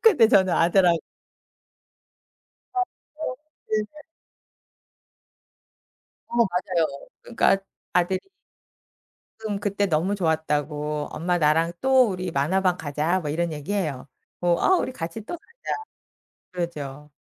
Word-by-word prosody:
근데 370 - +7
저는 190 -6 +5
아들하 175 +1 +5 1.8
아 375 - +2 0.4
어 255 -5 -3 0.3
네네. 215 +8 -2 2.3
어 235 - -5
맞아요. 180 -9 +1
그러니까 230 -4 +3 0.3
아들이 180 +1 +2 1.3
응. 205 - -1
"그때 200 0 0
너무 175 +4 +1
좋았다."고. 150 -4 -1
"엄마 175 +2 0
나랑 165 +2 +3
또 260 -2 +5
우리 185 -1 -3
만화방 180 +5 +2
가자." 155 +5 0
뭐 150 -4 -3
이런 170 +2 -1
얘기 150 +5 -5
해요. 155 -11 -2 0.3
뭐 175 -1 +2
"아 375 - +5
우리 260 - -1
같이 170 0 -5
또 345 - -5
가자." 465 - -26 1.0
그러죠. 150 -5 -5
175 Hz, 215 characters per minute, -25 LUFS, 155-205 Hz, 2.3 s, 근데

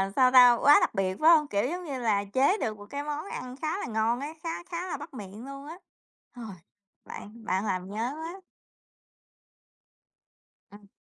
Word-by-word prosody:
sao 255 -1 +5
ta, 250 -1 +8
quá 290 - +7
đặc - - +1
biệt, 190 -1 -1
phải 315 - +6
hông? 310 -3 +5
Kiểu, 205 -4 0
giống 360 +3 -4
như 275 -4 -4
là, 215 -4 +1
chế 280 +10 +3
được 215 - -3
một 205 - -11
cái 285 0 -4
món 300 +2 -4
ăn 255 -10 -7
khá 315 +3 -1
là - - -4
ngon 225 +1 0
á, 290 +3 -6
khá 330 0 -4
khá 350 +1 -5
là 310 -5 -4
bắt 295 +3 -10
miệng 210 0 -9
luôn 275 +1 -9
á. 320 - -8 0.6
Rồi, 235 -4 -8 0.5
bạn 225 +3 -10
bạn 190 +2 -1
làm 185 -2 -3
nhớ 210 +2 -4
quá. 330 +5 -7 2.3
Ừm. 205 -1 -16
255 Hz, 190 wpm, -28 LUFS, 210-310 Hz, 2.3 s, ta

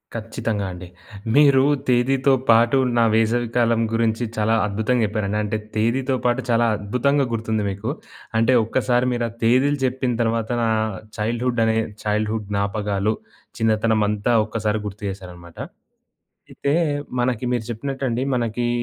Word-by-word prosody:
కచ్చితంగా 110 -2 -3
అండి. 90 0 -9 0.5
మీరు 140 -2 +6 0.2
తేదీతో 130 +2 +3 0.2
పాటు 115 +3 +5 0.2
నా 115 - +5
వేసవి 115 +2 +2
కాలం 115 -1 +3
గురించి 115 +1 +1
చాలా 110 +1 +2
అద్భుతంగా 110 +4 0
జెప్పారండి. 105 -1 -2
అంటే 105 +1 -2 0.2
తేదీతో 130 +5 +1
పాటు 120 +2 +2
చాలా 115 0 +3
అద్భుతంగా 130 +7 +1
గుర్తుంది 110 -1 -1
మీకు. 100 +5 -4 0.5
అంటే 115 +3 +3
ఒక్కసారి 125 +1 +1
మీరు 120 -1 -1
ఆ - - -12
తేదీలు 135 +5 +3
చెప్పిన 130 0 -1
తర్వాత 115 0 0
నా 115 - +2 0.5
చైల్డ్‌హుడ్ 120 +2 -1
అనే 110 0 +1 0.3
చైల్డ్‌హుడ్ 105 0 -1
జ్ఞాపకాలు, 100 +1 0 0.5
చిన్నతనం 110 0 +2
అంతా 105 +3 0
ఒక్కసారి 110 -1 -1
గుర్తు 105 +1 -9
చేశారనమాట. 90 -3 -10 0.9
అయితే 140 +1 -1 0.5
మనకి 125 -1 0
మీరు 115 -2 -2
చెప్పినట్టండి. 130 0 -3
మనకి 120 0 -1
115 Hz, 130 wpm, -22 LUFS, 105-125 Hz, 0.9 s, మీరు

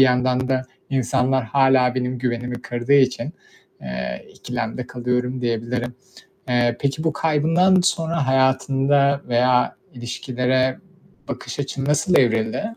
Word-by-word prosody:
yandan 125 0 +3
da 130 -1 +1 0.3
insanlar 130 0 +1
hâlâ 130 0 +3
benim 125 0 -2
güvenimi 125 0 -3
kırdığı 120 +3 -2
için, 130 +1 +3 0.5
eee, 65 -1 -5
ikilemde 125 0 -5
kalıyorum 125 +1 -2
diyebilirim. 120 +1 -2 0.6
Eee, 120 -1 +2
peki 140 +3 -1
bu 160 -2 +1
kaybından 165 +5 +3
sonra 165 -5 0
hayatında 135 +1 +2
veya 125 +1 +2 0.2
ilişkilere 125 +1 -1 0.5
bakış - - -6
açın 135 -1 -3
nasıl 150 +5 +2
evrildi? 115 - +1
130 Hz, 115 wpm, -21 LUFS, 120-140 Hz, 0.6 s, yandan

